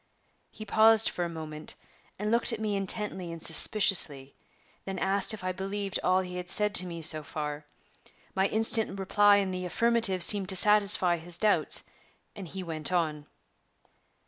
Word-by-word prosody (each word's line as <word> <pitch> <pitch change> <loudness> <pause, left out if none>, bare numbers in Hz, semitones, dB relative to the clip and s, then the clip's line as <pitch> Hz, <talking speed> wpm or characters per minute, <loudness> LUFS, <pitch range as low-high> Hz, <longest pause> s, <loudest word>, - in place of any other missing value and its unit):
He 215 - -12
paused 220 +1 +3
for 175 - -5
a 170 - -5
moment, 155 -2 -8 0.4
and 210 +2 -4
looked 235 +1 +1
at 230 - -5
me 215 -2 -3
intently 195 -2 -3
and 165 -1 -11
suspiciously; 160 -6 +2 0.5
then 195 -1 -7
asked 195 +1 +2
if 215 -3 -6
I 185 - -3
believed 195 +1 -5
all 185 +1 +1
he 180 -1 -8
had 180 0 -8
said 210 +1 +1
to 185 -1 +6
me 170 -2 -8
so 155 0 -1
far. 150 0 -8 0.7
My 190 +1 0
instant 220 -2 0
reply 205 +1 +2
in 195 -2 -2
the 185 0 -6
affirmative 205 0 +3
seemed 195 0 +4
to 190 - 0
satisfy 200 -3 +4
his 170 +1 -8
doubts, 210 +2 0 0.5
and 195 -4 -10
he 190 +3 -8
went 160 -1 -4
on. 155 -4 -3
190 Hz, 170 wpm, -26 LUFS, 170-210 Hz, 0.7 s, to